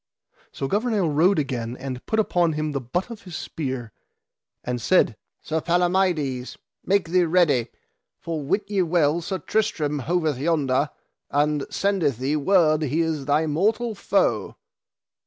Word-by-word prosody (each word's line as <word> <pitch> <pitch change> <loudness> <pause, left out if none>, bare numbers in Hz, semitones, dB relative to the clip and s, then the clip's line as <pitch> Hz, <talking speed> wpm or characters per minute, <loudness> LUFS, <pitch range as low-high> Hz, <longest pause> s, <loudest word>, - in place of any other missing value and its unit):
So 135 - -4
Gouvernail 205 - +1
rode 170 +6 +3
again 125 -5 -2
and 130 -2 -6
put 220 - +1
upon 175 -6 +2
him 155 0 -2
the 140 -2 -2
butt 175 - -3
of 225 -1 -8
his 180 -5 -9
spear, 130 -7 -4 0.7
and 125 -1 -3
said: 180 -9 +3 0.3
Sir 160 0 -1
Palamides, 175 -7 0 0.3
make 195 -3 +1
thee 180 0 +3
ready, 160 -8 +3 0.5
for 165 -2 -4
wit 170 +9 0
ye 200 -2 +1
well 165 -2 +2
Sir 190 +3 -3
Tristram 155 -6 -1
hoveth 155 -1 0
yonder, 145 -2 +1 0.4
and 145 0 +1
sendeth 185 - 0
thee 135 +4 -1
word 155 0 +3
he 155 +2 0
is 160 -4 -1
thy 150 +2 +2
mortal 215 +9 0
foe. 355 - 0
160 Hz, 145 wpm, -24 LUFS, 140-185 Hz, 0.7 s, rode